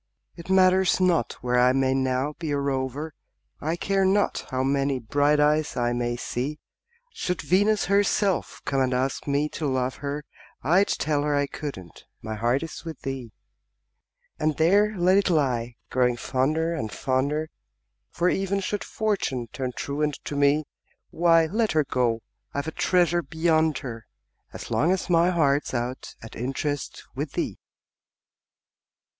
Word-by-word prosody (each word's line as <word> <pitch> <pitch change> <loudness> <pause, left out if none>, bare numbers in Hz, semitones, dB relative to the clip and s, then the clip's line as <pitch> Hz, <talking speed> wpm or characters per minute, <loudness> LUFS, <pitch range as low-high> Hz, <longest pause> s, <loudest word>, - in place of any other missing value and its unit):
It 170 +1 -11
matters 190 0 +4
not 175 -9 +2
where 125 0 +2
I 125 +1 +5
may 130 0 +2
now 130 +2 0
be 165 -3 -3
a 145 - 0
rover, 140 +2 -2 0.5
I 160 +3 -1
care 195 +2 0
not 195 +2 +1
how 130 -2 -1
many 135 0 +1
bright 145 +5 +2
eyes 150 +1 +2
I 120 0 +1
may 120 0 -1
see; 130 +4 -3 0.6
Should 180 - -3
Venus 205 +3 +3
herself 200 -1 +1
come 135 -1 +1
and 130 -1 +1
ask 130 +3 -1
me 145 +1 +1
to 150 - -3
love 130 -1 -1
her, 145 +1 -4 0.4
I'd 180 +8 +4
tell 150 -1 0
her 145 0 0
I 145 0 +2
couldn't 135 - -8
my 110 0 -5
heart 120 +6 0
is 165 - -7
with 165 -4 -8
thee. 130 -4 -5 1.1
And 155 -1 0
there 200 +6 +3
let 185 +2 +4
it 200 - 0
lie, 125 -7 0 0.2
growing 125 -1 +2
fonder 150 +7 0
and, 125 -10 -3
fonder 140 +4 -1 0.6
For, 175 - 0
even 195 +1 +1
should 205 +1 -2
Fortune 180 - -2
turn 130 -2 -3
truant 145 +3 -2
to 145 - -5
me, 145 +2 +3 0.5
Why, 165 -1 +4
let 215 +4 0
her 155 -1 +3
go 120 -4 0 0.3
I've 140 +2 -2
a - - -2
treasure 175 0 +2
beyond 160 0 +1
her, 115 -3 -7 0.4
As - - -9
long 165 +5 +2
as 190 -1 -1
my 170 +1 +5
heart's 145 -6 +1
out 120 +2 -4
at 110 - -10
interest 135 +3 -3
With - - -4
thee! - - -3
145 Hz, 155 wpm, -25 LUFS, 130-170 Hz, 1.1 s, I